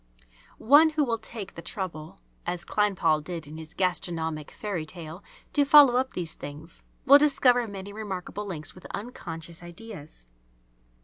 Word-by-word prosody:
One 290 +7 +6
who 310 -1 +1
will 230 -4 -1
take 220 -3 -8
the - - -8
trouble, 165 - -6 0.2
as 175 -1 -3
Kleinpaul 185 -7 +2
did 170 -1 -6
in 155 +2 -9
his 160 0 -10
"Gastronomic 165 -4 -1
Fairy 200 -7 -4
tale," 165 +2 -8 0.3
to 290 - +4
follow 285 -3 +8
up 260 +1 0
these 170 -3 -4
things, 150 +3 -9 0.2
will 280 +2 +9
discover 250 -5 +4
many 200 0 -8
remarkable 205 -1 -5
links 155 -5 -4
with 185 - -15
unconscious 170 -7 -7
ideas. 175 - -10
185 Hz, 145 wpm, -27 LUFS, 160-230 Hz, 0.3 s, will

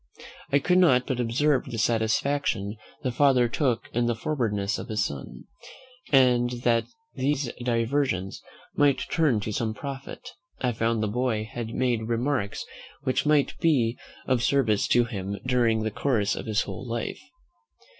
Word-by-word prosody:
I 140 - +5
could 180 +6 +3
not 130 -9 +5
but 130 -2 -2
observe 130 +4 +1
the 120 -3 -6
satisfaction 115 -1 0 0.3
the 130 - 0
father 130 -1 +4
took 125 0 0
in 120 0 +1
the 120 - +1
forwardness 110 -6 -1
of - - -7
his 105 -3 0
son; 70 -2 -7 0.7
and 125 -3 +5
that 115 -1 +3 0.3
these 135 -1 -1
diversions 115 -5 0 0.3
might 140 -2 +2
turn 145 -10 +2
to 105 - -4
some 110 0 -2
profit, 135 +2 -7 0.3
I 125 - 0
found 115 -1 0
the - - +1
boy 110 -1 -1
had 115 -1 -5
made 120 -3 0
remarks 120 -2 -1 0.4
which 130 +2 0
might 150 -2 +3
be 130 -9 +2 0.3
of 130 -2 +1
service 115 -4 +2
to 120 - +4
him 100 -3 -4
during 120 -3 +2
the 110 - -1
course 110 -4 0
of - - -6
his 110 0 +1
whole - - -7
life. 115 0 -3
120 Hz, 155 wpm, -26 LUFS, 110-135 Hz, 0.7 s, I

